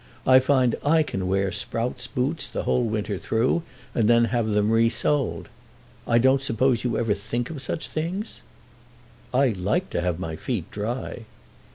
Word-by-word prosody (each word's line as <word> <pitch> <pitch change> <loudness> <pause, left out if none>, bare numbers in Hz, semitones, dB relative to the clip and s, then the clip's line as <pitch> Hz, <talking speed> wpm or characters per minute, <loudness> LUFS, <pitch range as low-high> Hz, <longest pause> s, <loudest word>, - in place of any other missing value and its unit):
I 130 0 +7
find 130 -2 +2
I 160 +2 +4
can 95 -10 -3
wear 95 0 +1
Sprout's 115 +6 -3
boots 140 +5 -1
the - - -4
whole 125 - +1
winter 105 -3 -2
through 120 +9 +1 0.3
and 110 -3 +2
then 120 0 +5
have 120 -2 +1
them 105 0 +2
resoled. 115 +5 +2 0.6
I 115 - +4
don't 130 +3 +4
suppose 130 -1 +1
you 120 -3 0
ever 115 -3 +1
think 110 +6 -3
of 145 -5 -6
such 140 - -4
things?" 180 +8 -4 0.9
"I 135 +1 +3
like 110 - -1
to - - -1
have 90 -2 -1
my 80 -3 -4
feet 100 -3 -4
dry." 115 +2 -4
120 Hz, 165 wpm, -24 LUFS, 105-130 Hz, 0.9 s, I